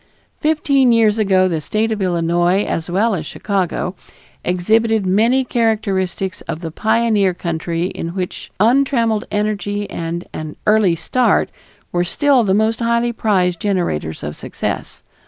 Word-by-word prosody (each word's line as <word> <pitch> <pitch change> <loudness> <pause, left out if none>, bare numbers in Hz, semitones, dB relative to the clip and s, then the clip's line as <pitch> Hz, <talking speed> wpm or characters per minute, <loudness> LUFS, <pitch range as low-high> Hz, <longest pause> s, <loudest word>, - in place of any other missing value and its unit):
Fifteen 285 -5 +3
years 225 -2 +3
ago 190 -3 +3
the 165 -4 -2
State 215 +8 -1
of 215 -2 -2
Illinois, 175 +1 +1
as 165 +1 -3
well 210 +6 +2
as 170 -5 -2
Chicago, 185 +1 -2 0.5
exhibited 220 +4 +1
many 230 +8 +3
characteristics 205 -5 -1
of 160 - -4
the 165 -2 -5
pioneer 220 -2 +1
country 170 0 -3
in 170 -2 -5
which 185 -2 -5
untrammeled 230 -1 +2
energy 205 -1 -2
and 170 +1 -4
an 155 -1 -6
"early 210 -5 +4
start" 245 +9 +1 0.4
were 175 0 +1
still 260 +8 +2
the 190 -2 +2
most 220 +1 +1
highly 235 0 +1
prized 185 -6 +1
generators 175 - -2
of 75 +1 -5
success. - - -5
200 Hz, 135 wpm, -18 LUFS, 175-225 Hz, 0.5 s, early